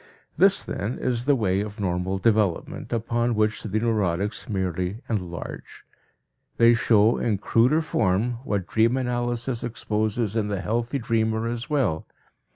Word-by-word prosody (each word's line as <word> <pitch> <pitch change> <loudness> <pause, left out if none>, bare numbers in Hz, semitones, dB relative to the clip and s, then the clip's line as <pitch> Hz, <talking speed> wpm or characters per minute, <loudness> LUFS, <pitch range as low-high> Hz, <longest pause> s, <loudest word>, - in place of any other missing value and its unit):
This, 195 +4 +4
then, 105 +5 -4
is 120 -1 -1
the 145 0 +4
way 100 -5 +1
of 105 +1 -6
normal 95 0 -1
development, 105 -3 0
upon 115 +1 0
which 110 0 +1
the 110 0 -1
neurotics 105 -3 -1
merely 95 -1 -2
enlarge. 90 -6 -5 0.7
They 115 0 +6
show 115 -1 +3
in 110 -4 0
cruder 125 +10 +2
form 115 -2 0
what 100 -9 -2
dream 115 +5 +2
analysis 120 -1 -2
exposes 110 -1 -1
in 110 -2 0
the 100 -3 -2
healthy 120 +6 -1
dreamer 110 -2 0
as 120 +4 -4
well. 120 - 0
110 Hz, 140 wpm, -25 LUFS, 100-120 Hz, 0.7 s, They